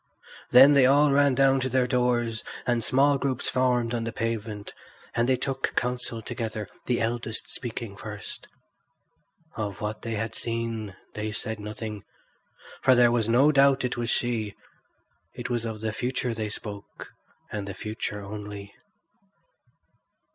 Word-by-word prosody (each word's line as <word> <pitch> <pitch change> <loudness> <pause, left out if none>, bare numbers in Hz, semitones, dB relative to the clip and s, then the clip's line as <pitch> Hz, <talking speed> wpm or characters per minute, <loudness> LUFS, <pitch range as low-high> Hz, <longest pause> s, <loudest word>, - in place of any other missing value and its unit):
Then 135 +4 +9
they 135 -3 +6
all 145 +2 +5
ran 140 -1 +4
down 135 0 +4
to 130 0 -1
their 130 0 +2
doors, 120 -2 +1 0.2
and 120 -2 +1
small 140 +4 +4
groups 130 -2 -1
formed 125 -2 +2
on 115 -1 -1
the 115 - -3
pavement; 110 -2 -3 0.4
there 120 - +3
they 130 +2 +3
took 135 +1 -2
counsel 120 -2 -1
together, 110 -3 -4 0.2
the 125 - +1
eldest 115 0 -2
speaking 115 -4 -5
first. 105 0 -8 1.1
Of 105 -3 -4
what 105 +1 -4
they 115 -1 -3
had 110 +2 -3
seen 115 -3 -3 0.2
they 110 0 -3
said 110 +1 -4
nothing, 105 0 -6 0.8
for 130 -1 +6
there 120 -1 +6
was 115 -2 +1
no 135 +6 +5
doubt 135 -2 +4
it 125 - -1
was 120 0 -2
she; 115 -5 0 0.8
it - - -5
was 120 -1 0
of 110 -2 -5
the 110 -1 -2
future 125 +1 -1
they 110 -1 -3
spoke, 100 -1 -8 0.4
and 105 -2 -4
the 100 - -5
future 105 0 -4
only. 100 0 -7
115 Hz, 150 wpm, -27 LUFS, 110-125 Hz, 1.1 s, Then